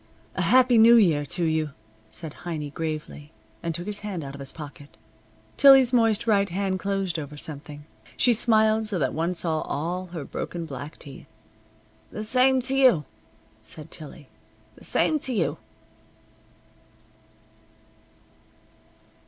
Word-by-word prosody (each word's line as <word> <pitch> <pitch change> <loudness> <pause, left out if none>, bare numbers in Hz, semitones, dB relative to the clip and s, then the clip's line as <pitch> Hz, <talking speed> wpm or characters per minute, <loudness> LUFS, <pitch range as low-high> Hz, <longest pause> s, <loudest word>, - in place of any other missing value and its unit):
"A - - -2
Happy 250 -2 +5
New 230 +2 +8
Year 160 -10 +3
to 175 - -3
you," 155 -2 -1 0.4
said 160 -3 -8
Heiny 155 -4 -4
gravely, 155 -2 -5 0.3
and 165 -1 -3
took 175 +2 -5
his 210 0 -4
hand 195 -6 -5
out 135 -1 -7
of 140 - -10
his 135 -1 -3
pocket. 145 -2 -11 0.6
Tillie's 270 -3 +7
moist 225 -2 +3
right 200 -3 +2
hand 190 +1 -2
closed 195 -4 -2
over 150 0 -8
something. 145 0 -7 0.3
She 245 - +4
smiled 220 -1 +3
so 205 -3 -1
that 135 -6 -1
one 165 +4 -1
saw 160 -2 -1
all 175 +5 -3
her 170 -5 -7
broken 170 +4 -5
black 145 0 -8
teeth. 140 -3 -12 0.8
"The 215 - -6
same 255 +3 +3
t' 270 +2 0
you," 185 - +5 0.6
said - - -11
Tillie. - - -10 0.5
"The - - -13
same 310 - +1
t' 260 -7 -3
you." 155 -2 -1
175 Hz, 140 wpm, -25 LUFS, 150-220 Hz, 0.8 s, New